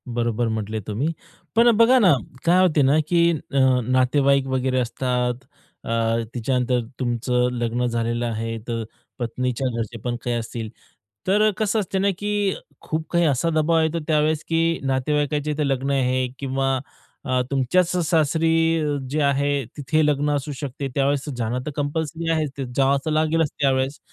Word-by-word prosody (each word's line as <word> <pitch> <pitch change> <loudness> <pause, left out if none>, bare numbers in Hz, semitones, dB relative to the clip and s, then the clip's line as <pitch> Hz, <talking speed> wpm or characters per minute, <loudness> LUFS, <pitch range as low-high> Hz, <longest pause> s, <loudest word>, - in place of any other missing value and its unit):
बरोबर 120 0 0
म्हटले 110 -1 -3
तुम्ही, 125 +10 -1 0.4
पण 235 +1 +6
बघा 230 +3 +6
ना 190 -8 +6 0.3
काय 180 +2 +5
होते 160 -5 +3
ना, 140 +3 +4
की 170 0 +4
अ, 140 -3 -2 0.2
नातेवाईक 135 +2 +2
वगैरे 130 0 0
असतात 125 +1 -1 0.4
अ, - - -8 0.4
त्याच्यानंतर 125 +1 0 0.2
तुमचं 125 0 0
लग्न 120 0 -1
झालेलं 120 0 -1
आहे. 115 0 -3
तर 115 -1 -2 0.4
पत्नीच्या 125 +2 -2
घरचे 115 0 -4
पण 120 -1 -2
काही 120 -1 -1
असतील, 115 -1 -4 0.6
तर 210 +3 +4
कसं 215 0 +1
असते 190 -1 -2
ना, 200 - +2
की 205 -1 0 0.3
खूप 160 0 -3
काही 170 0 +3
असा 145 +4 +1
दबाव 160 +1 +2
येतो 160 +1 0
त्यावेळेस, 155 0 +2
की 165 0 +1
नातेवाईकांचे 145 +2 0
लग्न 135 +1 -1
आहे 130 -1 +1
किंवा 135 -1 0 0.5
अ, 130 -2 +1
तुमच्याच 140 +7 +2 0.2
सासरी 165 +1 +2 0.3
जे 150 +2 0
आहे. 140 0 +1
तिथे 155 +2 +1
लग्न 145 0 +1
असू 145 +1 -4
शकते 140 0 -5
त्यावेळेस 140 +1 0
ज्यांना 120 +1 -2
तर 150 - -2
कंपल्सरी 160 +3 -2
आहेच 155 -4 -1 0.2
जाव 135 0 +3
लागेलच 155 0 +2
त्यावेळेस. 135 0 +1
140 Hz, 145 wpm, -23 LUFS, 125-160 Hz, 0.6 s, पण